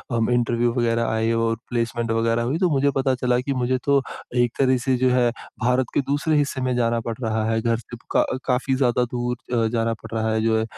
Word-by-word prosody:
अम 115 0 +1
interview 120 0 +1
वगैरह 115 -1 +1
आए 110 +1 0
और 115 0 +1
प्लेसमेंट 120 -1 -1
वगैरह 115 +1 +1
हुई 130 +6 -1
तो 180 - +3
मुझे 140 -1 +2
पता 135 -1 +2
चला 125 0 +1
कि, 135 +2 -2
मुझे 130 0 0
तो 140 -1 +4 0.3
एक 120 -1 +2
तरह 130 -1 +4
से 130 - +2
जो 130 - +5
है 125 -1 +3 0.3
भारत 125 +1 +2
के - - +2
दूसरे 145 +3 0
हिस्से 140 -2 0
में 130 -1 0
जाना 115 -1 +1
पड़ 115 - -3
रहा 110 -2 0
है 115 0 0
घर 115 0 +1
से 120 +1 -10 0.2
क - - +6
अ 130 - -1
काफ़ी 130 +1 +1
ज़्यादा 125 -2 +2
दूर 120 -1 -1
जाना 115 0 +1
पड़ - - -10
रहा 110 0 0
है 110 - +1
जो 110 0 +2
है। - - 0
120 Hz, 235 wpm, -23 LUFS, 115-130 Hz, 0.3 s, क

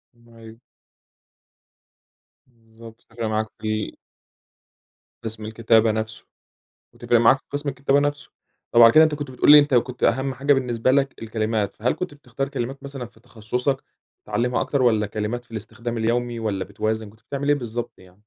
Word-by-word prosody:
أيوه. 115 -1 -15 1.9
بالضبط، 115 -1 -16
تفرِق 115 0 -7
معاك 110 0 0 0.2
في 110 - -4 0.2
ال - - -9 1.3
قسم 110 -1 -6
الكتابة 110 0 +3
نفسه، 110 0 -4 0.7
وتفرِق 120 -1 +1
معاك 120 +4 +5
في - - -33
قسم 145 0 -3
الكتابة 135 +1 +1
نفسه. 145 0 -2 0.4
طب، 120 - +5
على 115 0 +9
كده 160 +1 +8
أنت 155 -1 0
كنت 145 -2 -6
بتقول 130 - +3
لي 150 - +11
أنت 145 -2 +3
كنت 125 +1 0
أهم 130 +2 +1
حاجة 140 +3 +2
بالنسبة 125 -2 +1
لك 135 -2 0
الكلمات، 110 -2 -2
فهل 120 +4 +1
كنت 180 -5 -5
بتختار 135 -1 -5
كلمات 135 0 -5
مثلًا 135 -3 -7
في 110 -1 -21
تخصصك 125 +3 -3 0.4
تتعلمها 125 +1 0
أكتر؟ 140 -3 0
والّا 110 -4 +3
كلمات 110 +4 -4
في 115 - -32
الاستخدام 115 +2 -5
اليومي 120 +1 -1
والّا 105 -4 -2
بتوازن؟ 110 +1 -3
كنت 110 +1 -23
بتعمل 140 +3 -4
إيه 145 - +5
بالضبط 120 -3 -5
يعني؟ 90 -1 -18
120 Hz, 165 wpm, -23 LUFS, 110-135 Hz, 1.9 s, لي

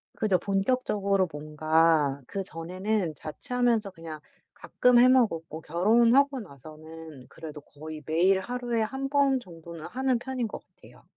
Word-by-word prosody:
그죠. 200 -4 +2
본격적으로 200 -1 0
뭔가 155 -1 +1
그전에는 185 -1 -3
자취하면서 235 - -1
그냥 165 -3 -9 0.3
가끔 250 -1 +2
해 250 - +7
먹었고 165 - +1
결혼하고 235 - +3
나서는 155 - -12
그래도 150 -2 -9
거의 155 +2 -10
매일 180 +5 +3
하루에 240 +1 -2
1 265 +5 -3
번 280 -2 +3
정도는 170 -5 -11
하는 260 -1 0
편인 255 -3 -3
거 - - -7
같아요. - - -20
190 Hz, 295 characters per minute, -27 LUFS, 160-240 Hz, 0.3 s, 해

